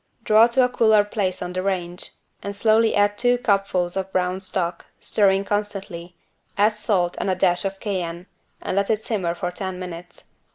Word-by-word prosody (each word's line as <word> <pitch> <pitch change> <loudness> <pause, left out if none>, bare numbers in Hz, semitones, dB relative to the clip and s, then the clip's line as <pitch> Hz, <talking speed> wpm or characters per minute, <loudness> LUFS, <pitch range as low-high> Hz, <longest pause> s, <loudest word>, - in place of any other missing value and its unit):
Draw 220 +2 +6
to 250 +2 +3
a - - -1
cooler 220 -4 +4
place 195 -3 -2
on 180 0 -5
the 185 - -2
range 180 -2 -2 0.3
and 200 0 -5
slowly 220 +1 +3
add 205 0 +2
two 245 0 +3
cupfuls 195 -5 0
of 190 0 -3
brown 185 0 0
stock, 180 -2 -2 0.2
stirring 195 -1 +2
constantly, 195 -4 -4 0.4
add 210 +2 +4
salt 190 -5 0
and - - -1
a 185 - +1
dash 180 +1 +1
of 195 0 -3
Cayenne 180 -4 -4 0.4
and - - -2
let 210 +2 +1
simmer 190 -7 -2
for 180 0 -3
ten 190 0 -5
minutes. 180 -1 -9
195 Hz, 175 wpm, -23 LUFS, 180-210 Hz, 0.4 s, Draw